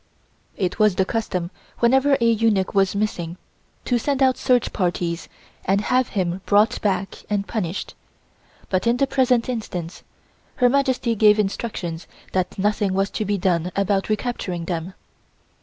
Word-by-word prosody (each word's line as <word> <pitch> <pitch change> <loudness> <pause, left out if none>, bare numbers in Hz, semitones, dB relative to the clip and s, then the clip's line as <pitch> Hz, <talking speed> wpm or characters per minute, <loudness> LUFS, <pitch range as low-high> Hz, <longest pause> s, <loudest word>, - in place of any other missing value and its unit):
It 185 +2 -2
was 215 -3 +4
the 190 - +2
custom 185 -6 -2 0.3
whenever 265 +4 +4
a 235 - +2
eunuch 220 -4 +2
was 195 -1 +2
missing 180 -5 -2 0.5
to 245 -1 +1
send 275 +2 0
out 260 -1 +4
search 250 -2 +1
parties 175 -2 -2 0.3
and 195 +2 +2
have 250 +3 +1
him 180 0 -1
brought 210 +2 +3
back 195 -1 -2
and 205 -1 -1
punished, 185 -5 -3 0.8
but 185 +4 +1
in 235 +1 +3
the 275 - +3
present 255 -3 +2
instance 185 -8 -5 0.5
Her 250 -1 +4
Majesty 260 -3 +1
gave 210 -1 +5
instructions 195 -5 -3 0.2
that 185 -1 -1
nothing 205 -1 +1
was 195 +1 0
to 215 - -2
be 205 0 0
done 175 -1 0
about 200 0 0
recapturing 210 -6 -2
them. 175 +2 -4
205 Hz, 150 wpm, -22 LUFS, 185-235 Hz, 0.8 s, gave